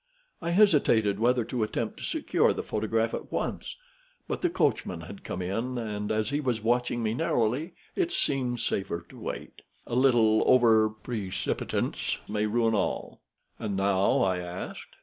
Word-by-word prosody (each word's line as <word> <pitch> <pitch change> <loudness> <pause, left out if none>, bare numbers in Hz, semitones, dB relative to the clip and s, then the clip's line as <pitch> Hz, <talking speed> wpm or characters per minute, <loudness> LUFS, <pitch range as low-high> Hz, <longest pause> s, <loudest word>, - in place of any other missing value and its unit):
I 170 - -2
hesitated 145 - +4
whether 120 0 +2
to 120 0 -3
attempt 110 - -2
to - - -8
secure - - +2
the - - -4
photograph 110 +1 0
at - - -5
once; - - -3 0.5
but - - -3
the 355 - +2
coachman 110 - 0
had 95 +4 -10
come 90 - -4
in, 115 +8 -2
and 105 -3 -3
as 110 0 0
he 145 - +1
was 125 -6 0
watching 120 0 +1
me 110 0 0
narrowly, 125 +8 0 0.2
it 355 -2 0
seemed 130 - 0
safer 85 -3 -2
to - - -13
wait. - - -6 0.2
A - - -7
little 120 -4 +4
over 115 -4 +5
precipitance 110 -3 -2
may 105 +1 0
ruin 115 +1 +2
all." 100 -3 -2 0.4
"And 100 -2 -2
now?" 95 0 +3
I 95 -2 +1
asked. 90 +1 -7
110 Hz, 160 wpm, -28 LUFS, 105-125 Hz, 0.5 s, over